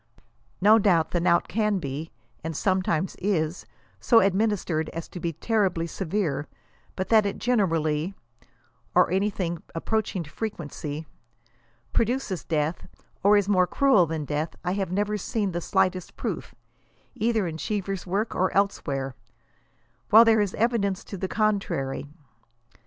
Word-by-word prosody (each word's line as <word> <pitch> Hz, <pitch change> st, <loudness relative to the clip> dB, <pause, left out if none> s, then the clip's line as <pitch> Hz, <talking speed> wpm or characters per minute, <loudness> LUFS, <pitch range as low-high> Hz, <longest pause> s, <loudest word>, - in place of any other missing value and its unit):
No 215 Hz, +3 st, +7 dB
doubt 175 Hz, -6 st, +3 dB
the 175 Hz, -, +1 dB
knout 170 Hz, 0 st, +3 dB
can 210 Hz, -1 st, +1 dB
be, 155 Hz, -1 st, -5 dB, 0.3 s
and 160 Hz, -2 st, -4 dB
sometimes 185 Hz, -2 st, 0 dB
is, 175 Hz, -4 st, -1 dB, 0.3 s
so 230 Hz, -, +5 dB
administered 190 Hz, -5 st, +1 dB
as 165 Hz, 0 st, -6 dB
to 180 Hz, -, -8 dB
be 170 Hz, -1 st, -2 dB
terribly 190 Hz, -2 st, 0 dB
severe, 165 Hz, -4 st, -2 dB, 0.5 s
but 190 Hz, -, -3 dB
that 220 Hz, -2 st, +6 dB
it 200 Hz, -, -3 dB
generally 165 Hz, -7 st, 0 dB, 0.8 s
(or -, -, +5 dB
anything 185 Hz, -3 st, -1 dB
approaching 200 Hz, +1 st, -1 dB
to 145 Hz, -, -13 dB
frequently,) 155 Hz, -7 st, -5 dB, 0.9 s
produces 230 Hz, -5 st, 0 dB
death, 155 Hz, +1 st, -1 dB, 0.3 s
or 205 Hz, +1 st, +6 dB
is 200 Hz, -1 st, +1 dB
more 185 Hz, -3 st, +3 dB
cruel 260 Hz, -10 st, +4 dB
than 155 Hz, -1 st, -3 dB
death, 150 Hz, +2 st, -2 dB
I 180 Hz, -, +1 dB
have 195 Hz, -2 st, -2 dB
never 205 Hz, +2 st, 0 dB
seen 205 Hz, -1 st, -1 dB
the 175 Hz, 0 st, -3 dB
slightest 185 Hz, +1 st, 0 dB
proof, -, -, -4 dB, 0.6 s
either 225 Hz, -3 st, +1 dB
in 160 Hz, -2 st, -4 dB
Cheevcr's 195 Hz, +2 st, -3 dB
work 205 Hz, +5 st, -1 dB
or 185 Hz, -, +1 dB
elsewhere; 140 Hz, -9 st, 0 dB, 1.0 s
while 225 Hz, +2 st, +9 dB
there 220 Hz, -1 st, +5 dB
is 200 Hz, -2 st, -1 dB
evidence 210 Hz, -4 st, 0 dB
to -, -, -8 dB
the 190 Hz, -, -2 dB
con 215 Hz, 0 st, +2 dB
trary. 135 Hz, -6 st, -4 dB
185 Hz, 140 wpm, -26 LUFS, 165-210 Hz, 1.0 s, while